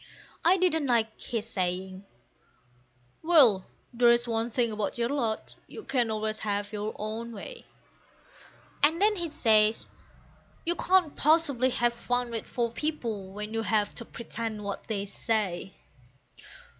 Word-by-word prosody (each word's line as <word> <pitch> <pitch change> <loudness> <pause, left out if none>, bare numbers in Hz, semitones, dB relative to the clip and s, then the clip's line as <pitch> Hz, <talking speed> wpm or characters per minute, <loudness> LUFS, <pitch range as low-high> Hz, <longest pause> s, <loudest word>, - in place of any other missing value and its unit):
I 360 +3 +5
didn't 320 -5 +2
like 225 -3 0
his 225 -2 -3
saying, 185 -1 -2 1.2
"Well, 270 - +5 0.3
there's 240 0 +4
one 230 0 0
thing 235 -1 0
about 210 0 -3
your 235 0 0
lot, 235 -6 -2
you 440 - -9
can 245 -4 +1
always 215 0 -1
have 205 0 -2
your 210 +1 -4
own 220 +2 -5
way." 485 - -9 1.1
And 315 +4 +4
then 420 +2 +5
he 345 -3 -3
says, 220 -5 +3 0.8
"You 340 - +2
can't 360 -3 +2
possibly 290 -5 +3
have 240 -1 +1
fun 245 0 -1
with 225 -2 -4
four 235 -2 -1
people 230 -9 -4
when 210 +2 -6
you 225 - 0
have 215 -2 0
to 235 - -7
pretend 225 -2 -5
what 200 -1 -5
they 205 -3 -2
say." 200 -3 -2
230 Hz, 140 wpm, -28 LUFS, 215-265 Hz, 1.2 s, I